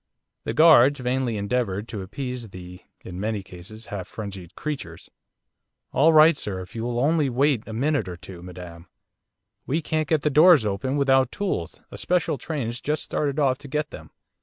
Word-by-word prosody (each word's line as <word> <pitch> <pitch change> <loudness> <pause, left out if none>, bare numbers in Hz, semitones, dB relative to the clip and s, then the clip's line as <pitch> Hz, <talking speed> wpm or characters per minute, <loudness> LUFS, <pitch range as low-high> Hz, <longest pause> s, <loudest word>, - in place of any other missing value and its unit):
The - - -2
guards 145 -4 +6
vainly 125 -2 -1
endeavoured 100 -1 -2
to 105 - -5
appease 125 +3 -6
the, 90 -1 -10 0.3
in 90 0 -7
many 105 -1 -2
cases, 100 +5 -12
half 100 -3 -6
frenzied 100 -5 -8
creatures. 130 - -6 0.8
'All 155 +4 +4
right, 155 +1 +7
sir! 95 -3 -4
If 90 - -11
you'll 120 +1 -3
only 150 +1 +2
wait 130 -1 +1
a 110 - -7
minute 135 -2 0
or 90 -1 -6
two, 85 0 -11
madam! 90 -1 -10 0.8
We 150 +5 +1
can't 155 -1 -1
get 155 -2 +1
the 150 - 0
doors 155 -3 +6
open 130 +8 -1
without 135 -2 +3
tools, 195 - -3
a - - -8
special 175 -6 0
train's 125 -5 -4
just 150 +1 -2
started 140 -2 -2
off 135 -4 +2
to 145 - -11
get 150 +2 -2
them. - - -10
125 Hz, 175 wpm, -24 LUFS, 100-145 Hz, 0.8 s, right